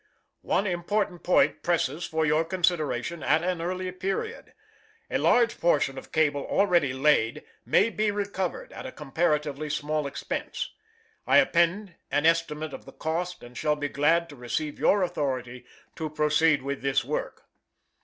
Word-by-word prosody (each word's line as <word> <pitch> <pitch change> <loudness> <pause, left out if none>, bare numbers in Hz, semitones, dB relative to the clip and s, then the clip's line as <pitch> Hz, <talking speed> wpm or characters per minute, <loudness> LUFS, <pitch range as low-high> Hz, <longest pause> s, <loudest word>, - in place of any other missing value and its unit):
One 200 - 0
important 180 0 -1
point 180 - +3
presses 170 -2 0
for 160 0 0
your 155 +2 +3
consideration 165 -4 -1
at - - +2
an 180 -1 -1
early 185 +2 -3
period. 195 - -4 0.6
A - - +1
large 235 -1 +3
portion 145 -5 +2
of - - -10
cable 145 -3 +2
already 175 -9 +2
laid 130 -4 +2 0.2
may 230 - +4
be 215 0 0
recovered 200 -3 -3
at - - -7
a - - -7
comparatively 150 0 -1
small 150 0 -1
expense. 140 - -4 0.6
I - - +6
append 185 -5 +2 0.2
an 145 +1 +1
estimate 155 -2 +1
of - - -9
the - - -12
cost, 175 +3 -3
and 120 0 -12
shall 150 +2 +1
be 145 -1 -3
glad 165 +5 +2
to 145 - -10
receive 140 +4 -3
your 200 -2 +4
authority 125 -6 -3 0.3
to 160 -2 -3
proceed 150 0 +2
with 140 0 -3
this 135 0 +1
work. - - -4
160 Hz, 155 wpm, -27 LUFS, 145-180 Hz, 0.6 s, I